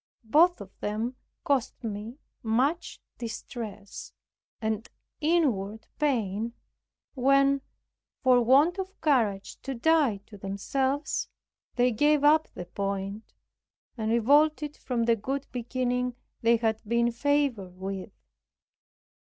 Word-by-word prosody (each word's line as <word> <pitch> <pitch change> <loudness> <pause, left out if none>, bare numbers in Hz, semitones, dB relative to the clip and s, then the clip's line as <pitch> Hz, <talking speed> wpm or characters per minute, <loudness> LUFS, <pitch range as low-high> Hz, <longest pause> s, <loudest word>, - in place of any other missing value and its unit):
Both 315 - +4
of 195 -1 -11
them 220 +4 -2 0.3
cost 275 -4 0
me 220 +3 -5 0.2
much 255 +9 0 0.2
distress 220 -3 -7 0.5
and 220 0 -2 0.3
inward 245 - +1
pain, 230 -6 0 0.6
when, 275 +1 +3 0.6
for 250 -2 +5
want 285 - +4
of 385 +1 -6
courage 225 -10 +1
to 270 - -4
die 290 -4 +3
to 205 -2 -13
themselves, 265 +9 -1 0.5
they 245 0 +3
gave 295 +5 +3
up 305 +2 +5
the 175 - -6
point; 195 +3 -4 0.6
and 220 -2 -2
revolted 295 +5 +3
from 245 -3 -2
the 230 0 +4
good 270 +6 -3
beginning 250 0 -1 0.3
they 235 0 +4
had 220 -1 0
been 235 +2 +1
favored 245 -8 0
with. 190 0 -5
240 Hz, 110 wpm, -28 LUFS, 215-280 Hz, 0.6 s, for